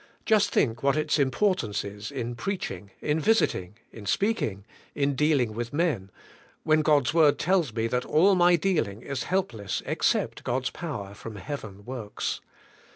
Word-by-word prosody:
Just 215 -2 +4
think 115 -3 +1
what 140 +2 +2
its 155 0 +1
importance 135 - +1
is 105 +1 -7
in 120 -4 -4
preaching, 115 - -4
in 150 +1 +1
visiting, 115 - +1
in 105 -3 -10
speaking, 105 - 0 0.3
in 140 0 +1
dealing 140 -5 +2
with 120 +3 -4
men, 145 - 0 0.5
when 155 0 +4
God's 145 -5 +3
word 155 -3 +5
tells 175 -6 +2
me 110 0 -1
that 125 +2 0
all 185 +6 +4
my 175 -1 +5
dealing 150 - 0
is 140 -2 -3
helpless 115 - -2
except - - 0
God's 130 +1 -1
power 115 - -6
from 110 +1 -9
heaven 100 -2 -7
works. 120 -5 -4
135 Hz, 155 wpm, -27 LUFS, 110-160 Hz, 0.5 s, word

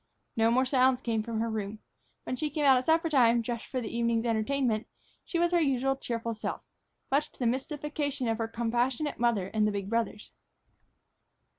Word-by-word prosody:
No 225 0 +3
more 255 +3 +3
sounds 255 -1 +3
came 230 -4 -1
from 225 0 -3
her 230 - -1
room. 215 -1 -3 0.5
When 255 - -3
she 300 +3 -2
came 295 0 -1
out 270 -1 +7
at 255 0 0
suppertime, 275 -8 +4
dressed 235 0 -4
for 255 - -2
the 230 -1 -5
evening's 235 0 +1
entertainment, 230 0 0 0.4
she 345 - -3
was 345 0 +2
her 345 -1 +3
usual 270 -2 +1
cheerful 230 -3 -3
self, 215 - -5 0.5
much 290 +3 +1
to - - -19
the 250 - -2
mystification 285 +1 -2
of 225 0 0
her 225 - -1
compassionate 240 +5 -1
mother 225 -6 +1
and 215 0 +1
the - - +1
big 200 0 -4
brothers. 230 -2 -2
240 Hz, 185 wpm, -29 LUFS, 225-270 Hz, 0.5 s, out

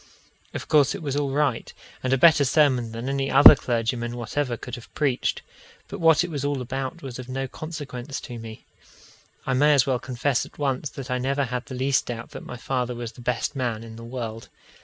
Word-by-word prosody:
Of - - -5
course 145 -3 +4
it - - -7
was 140 -2 -2
all 145 -1 0
right, 140 -4 0 0.3
and 130 - -1
a 135 - +4
better 160 +1 +6
sermon 130 -4 +3
than 115 +3 -5
any 135 0 -1
other 140 +2 +10
clergyman 120 0 -2
whatever 120 +1 -2
could 125 - -9
have 120 - -8
preached, 140 -5 0 0.4
but - - -7
what 165 -1 +5
it 175 - -5
was 145 -3 -3
all 145 -1 -1
about 135 +5 -4
was 130 -2 -7
of 125 0 -8
no 135 +1 -3
consequence 145 -3 -6
to 120 -2 -8
me. 110 -1 -10 0.8
I 135 - 0
may 145 +3 +5
as 135 - +4
well 130 -2 0
confess 130 +1 -1
at - - -13
once 140 0 -1
that 135 -1 -8
I 125 - 0
never 140 +2 0
had 125 0 -4
the 130 - -6
least 130 +1 +1
doubt 120 -1 -6
that - - -8
my 125 - -8
father 125 -1 -2
was 120 -1 -5
the 120 - -14
best 125 +3 -1
man 120 -4 -2
in 115 -1 -10
the 115 - -10
world. 115 -2 -6
130 Hz, 220 wpm, -25 LUFS, 120-140 Hz, 0.8 s, other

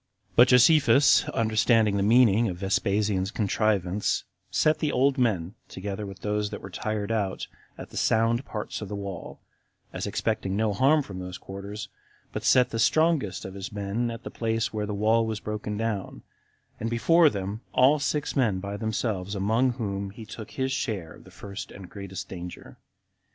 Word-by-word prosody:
25. - - -32
But 120 - +8
Josephus, 130 +1 +5
understanding 110 -1 +2
the 100 - +1
meaning 115 +1 +5
of 90 - -5
Vespasian's 95 0 0
contrivance, 105 -2 0 0.3
set 155 0 +2
the 150 -1 0
old 135 +1 +2
men, 100 -7 +1 0.2
together 100 +2 -5
with 95 -1 -10
those 105 0 -1
that - - -6
were 95 - -10
tired 110 +2 -3
out, 100 -4 -1 0.3
at - - -9
the - - -8
sound 115 +3 +2
parts 105 -5 -5
of 105 - -5
the 105 - -5
wall, 100 -1 -7 0.5
as - - -3
expecting 95 0 -1
no 110 -1 +1
harm 140 +8 +4
from 95 -7 -8
those 90 0 -6
quarters, 100 +3 -7 0.5
but - - -4
set 125 -1 +4
the 115 - -2
strongest 155 - +2
of 95 - -7
his 100 0 -6
men 105 +4 -2
at 115 -1 -7
the - - -7
place 115 -1 -1
where 105 -1 -2
the 105 - -3
wall 110 +3 +3
was 110 -1 -3
broken 105 -1 -4
down, 105 - -3 0.6
and 115 - -2
before 160 +8 +5
them 100 0 -4
all 140 +4 +5
six 150 0 -1
men 110 -9 +2
by 100 +1 -5
themselves, 105 -3 -2
among 110 +6 +2
whom 100 -5 -3
he 110 +3 -10
took 110 0 -9
his 130 0 -2
share 100 -11 -3
of - - -16
the - - -14
first 100 +2 -8
and 95 -3 -11
greatest 100 -2 -7
danger. 90 -1 -9
105 Hz, 180 wpm, -26 LUFS, 100-115 Hz, 0.6 s, But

